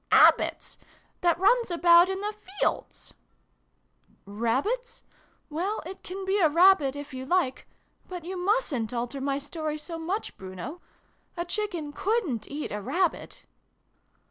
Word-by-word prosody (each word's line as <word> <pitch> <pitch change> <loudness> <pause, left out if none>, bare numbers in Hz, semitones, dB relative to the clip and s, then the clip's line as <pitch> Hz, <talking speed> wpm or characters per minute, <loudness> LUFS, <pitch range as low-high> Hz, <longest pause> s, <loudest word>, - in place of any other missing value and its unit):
" - - -45
Bab - - +8
bits - - -5 0.4
that 345 -2 +3
runs 460 +6 +3
about 345 +1 +6
in 385 0 -3
the 420 +1 -2
fields! 410 -1 -4 0.4
" - - -45
" - - -35
Rabbit? 260 - -2 0.4
Well 355 +7 -2
it 380 +2 -8
can 380 +1 -6
be 390 +2 +1
a 325 -5 +5
Rabbit, 335 -4 +5
if 285 -1 -8
you 260 0 -5
like. 270 -3 0 0.4
But 355 -3 -7
you 375 +2 -5
mustn't 355 - 0
alter 245 +3 -3
my 275 0 0
story 305 +1 -4
so 330 +2 -6
much, 365 +7 -3
Bruno. 190 - -8 0.6
A 345 - -2
Chicken 350 -6 -3
couldnt 360 - -1
eat 295 +1 -5
a 210 - -3
Rabbit 330 - -1
340 Hz, 150 wpm, -27 LUFS, 280-385 Hz, 0.6 s, Bab